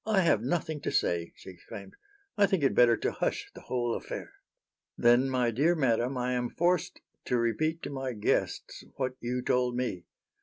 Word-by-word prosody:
"I 210 -3 +2
have 165 - +3
nothing 150 +3 -2
to - - -2
say," 85 -1 0
she - - -11
exclaimed. 100 +2 -11 0.4
"I 205 -1 +4
think 190 -6 0
it 135 - +3
better 120 -1 +5
to - - -1
hush - - -2
the - - -11
whole 120 -2 -1
affair." - - -6 0.6
"Then, 120 +3 +4
my 125 -2 +1
dear 150 +9 +2
madam, 125 -2 +1
I 125 0 -1
am 125 -1 -1
forced 175 +2 0 0.2
to 125 - +1
repeat 155 +8 0
to - - -4
my 135 -2 -3
guests 105 -2 -1
what 130 -2 -2
you 125 +1 -3
told 125 -1 +1
me. 120 -9 -3
125 Hz, 185 wpm, -29 LUFS, 120-150 Hz, 0.6 s, better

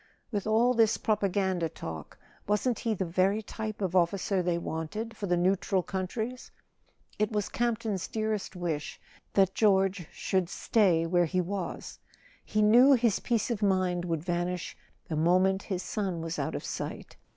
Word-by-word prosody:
With 205 -2 -2
all 230 +3 +4
this 225 -2 +3
propaganda 190 -5 0
talk, 80 - -8 0.3
wasn't 210 +3 +1
he 225 -2 -1
the 190 - -2
very 190 +5 +1
type 215 -1 -5
of 185 -1 -1
officer 185 +2 +2
they 175 -1 0
wanted 170 +8 -4
for 205 - -4
the 175 -1 +2
neutral 185 +1 +1
countries? 220 +8 -4 0.7
It 215 +1 +1
was 210 -2 -1
Camp 235 -1 0
ton's 210 -5 -3
dearest 215 -3 -2
wish 165 -5 -3 0.3
that 195 -1 +3
George 195 -4 +2
should 185 -3 -1
stay 185 -7 +2
where 175 +1 +3
he 185 +3 -1
was; 185 +1 -4 0.4
he 215 0 0
knew 245 +6 +7
his 235 -5 +2
peace 235 0 0
of 225 -3 -2
mind 185 -3 +1
would 165 -3 -2
vanish 175 0 -2 0.3
the 160 - -3
moment 185 +4 +3
his 185 -3 -4
son 190 -5 -2
was 165 +1 -4
out - - -2
of - - -4
sight. - - -5
190 Hz, 160 wpm, -29 LUFS, 175-215 Hz, 0.7 s, knew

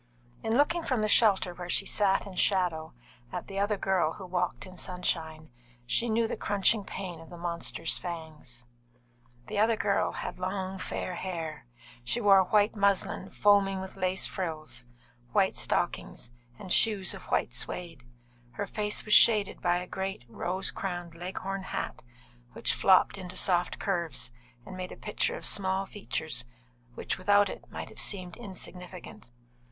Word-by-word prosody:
In 225 +2 +1
looking 335 +4 +3
from 255 -8 0
the - - +2
shelter 200 -4 +4
where 175 0 -7
she - - +3
sat 195 -2 +2
in 200 - -8
shadow, 180 -5 +1 0.4
at - - -4
the 195 0 -4
other 205 +1 +1
girl 185 -5 +1
who 195 - -9
walked 180 0 -2
in 185 -1 -11
sunshine, 160 -4 -3 0.3
she 235 - +1
knew 225 +1 +2
the - - -2
crunching 205 +1 +2
pain 180 -3 -6
of 165 - -13
the 175 - -9
monster's 170 -1 0
fangs. 155 -8 -7 0.8
The 210 - -3
other 225 +2 +4
girl 200 -2 +1
had - - -5
long, 190 0 -3
fair 185 - -3
hair; 165 -6 -5 0.4
she 180 - 0
wore 195 -4 +6
white 210 +3 +3
muslin, 200 -2 +1
foaming 200 -2 +4
with 190 0 -7
lace 185 0 +1
frills, 155 - -4 0.5
white - - +3
silk - - 0
stockings, 120 - -2 0.3
and 185 - -2
shoes 205 -4 +3
of - - -10
white - - 0
suede. 170 -7 -3 0.5
Her 205 - -3
face 210 +1 -2
was 210 - +1
shaded 210 -4 +6
by 175 -1 +3
a 180 - -4
great, 190 -7 -4
rose 185 +11 -1
crowned, 175 -3 -4
leghorn 190 +3 -4
hat, 190 - -4 0.5
which - - 0
flopped - - +4
into 185 0 -7
soft 180 -2 +2
curves 170 - -1 0.3
and 185 - -8
made 185 0 -5
a - - -9
picture 480 +1 -1
of - - -6
small 190 -1 +2
features 160 - -2 0.5
which - - -3
without 205 +2 +4
it - - -9
might - - -6
have - - -6
seemed 185 -4 0
insignificant. 180 - -8
185 Hz, 160 wpm, -29 LUFS, 175-200 Hz, 0.8 s, wore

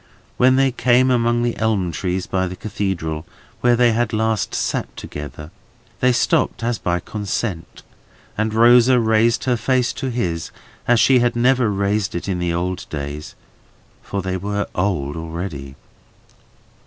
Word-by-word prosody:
When 130 +1 +5
they 135 0 +3
came 125 +1 +3
among 120 -1 +2
the 120 -1 0
elm 105 -6 0
trees 90 +1 -2
by 95 -1 -1
the 90 - -6
Cathedral, 90 -7 -3 0.4
where 120 0 +3
they 120 0 +4
had 115 0 0
last 110 0 0
sat - - -2
together, 75 +2 -8 0.5
they 125 - +4
stopped 120 -1 +1
as 115 -3 -1
by 90 -1 -1
consent, 100 -2 -4 0.5
and 110 +1 -1
Rosa 120 +3 +5
raised 115 +1 +2
her 125 -2 +1
face 125 0 +1
to 130 - -4
his, 90 -10 -2 0.4
as 120 -1 +4
she 130 +1 +5
had 120 0 +1
never 125 -1 +3
raised 100 0 -1
it 85 - -4
in 95 -2 -1
the 90 -1 -1
old 90 +2 -3
days;—for 75 +6 -8
they 95 0 -2
were 100 +2 -2
old 90 -7 -1
already. 80 -4 -6
105 Hz, 150 wpm, -20 LUFS, 90-120 Hz, 0.5 s, When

